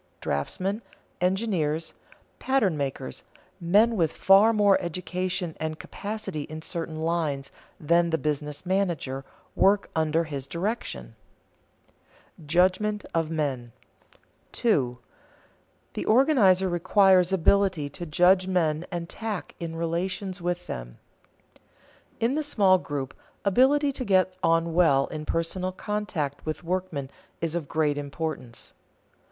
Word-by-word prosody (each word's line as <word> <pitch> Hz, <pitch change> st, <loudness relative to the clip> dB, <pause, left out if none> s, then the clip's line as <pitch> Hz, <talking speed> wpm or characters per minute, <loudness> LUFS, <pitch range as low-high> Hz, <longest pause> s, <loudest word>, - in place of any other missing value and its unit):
Draftsmen, 185 Hz, -, -2 dB, 0.4 s
engineers, 180 Hz, -5 st, 0 dB, 0.5 s
pattern 255 Hz, -11 st, +2 dB
makers, 135 Hz, -2 st, -4 dB, 0.4 s
men 205 Hz, +7 st, +4 dB
with 165 Hz, -6 st, +1 dB
far 195 Hz, +4 st, +5 dB
more 205 Hz, -3 st, +4 dB
education 180 Hz, 0 st, -3 dB
and 155 Hz, 0 st, -3 dB
capacity 210 Hz, -6 st, -5 dB
in 155 Hz, 0 st, -8 dB
certain 160 Hz, -2 st, -5 dB
lines 160 Hz, -5 st, -1 dB, 0.3 s
than 170 Hz, +2 st, +3 dB
the 160 Hz, -, +1 dB
business 150 Hz, 0 st, -3 dB
manager, 175 Hz, -8 st, -1 dB, 0.3 s
work 200 Hz, +1 st, +3 dB
under 160 Hz, +1 st, +2 dB
his 140 Hz, -4 st, -6 dB
direction. 200 Hz, +7 st, -4 dB, 1.2 s
[Sidenote: 160 Hz, -4 st, -15 dB
Judgment 185 Hz, +5 st, +2 dB
of 165 Hz, -1 st, 0 dB
men] 135 Hz, -7 st, -2 dB, 0.8 s
2. 130 Hz, -, +1 dB, 1.0 s
The -, -, -4 dB
organizer 215 Hz, -7 st, +4 dB
requires 185 Hz, +1 st, +4 dB
ability 190 Hz, -3 st, +2 dB
to 175 Hz, +5 st, -7 dB
judge 185 Hz, +4 st, +4 dB
men 165 Hz, -3 st, 0 dB
and 170 Hz, -2 st, -4 dB
tact 215 Hz, 0 st, -5 dB
in 165 Hz, -1 st, -5 dB
relations 180 Hz, +3 st, -3 dB
with 175 Hz, 0 st, -2 dB
them. -, -, -7 dB, 1.2 s
In 230 Hz, +3 st, +1 dB
the 310 Hz, -, 0 dB
small 200 Hz, -11 st, +4 dB
group, 140 Hz, -5 st, -4 dB, 0.3 s
ability 275 Hz, +8 st, +4 dB
to 265 Hz, -1 st, -5 dB
get 185 Hz, -4 st, +3 dB
on 165 Hz, 0 st, +2 dB
well 145 Hz, -6 st, +4 dB
in 155 Hz, -1 st, -6 dB
personal 180 Hz, +3 st, -1 dB
contact 185 Hz, -8 st, -3 dB
with 155 Hz, +2 st, -4 dB
workmen 170 Hz, -6 st, -3 dB, 0.3 s
is 165 Hz, -1 st, -2 dB
of 170 Hz, -4 st, -3 dB
great 150 Hz, -2 st, +1 dB
importance. 140 Hz, -5 st, -5 dB
175 Hz, 120 wpm, -26 LUFS, 155-195 Hz, 1.2 s, far